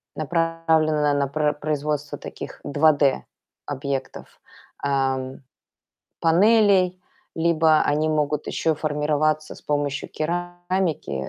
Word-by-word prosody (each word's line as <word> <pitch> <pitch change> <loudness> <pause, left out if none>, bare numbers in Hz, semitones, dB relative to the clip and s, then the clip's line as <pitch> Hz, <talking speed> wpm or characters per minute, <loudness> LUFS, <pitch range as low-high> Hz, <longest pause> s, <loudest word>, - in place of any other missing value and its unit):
направлено 160 -2 +1
на 140 -1 +1
про 150 +1 0
производство 150 0 -3
таких - - -9
2D 145 -1 +2 0.4
объектов, 140 -1 -5 0.4
ам, 135 -1 -1 0.8
панелей. 185 +1 +4 0.4
Либо 160 -1 +3
они 150 +2 +1
могут 150 -1 0
ещё 160 -1 0
формироваться 155 0 0
с - - -14
помощью 145 -1 -2
керамики 175 - -2
155 Hz, 90 wpm, -23 LUFS, 145-165 Hz, 0.8 s, панелей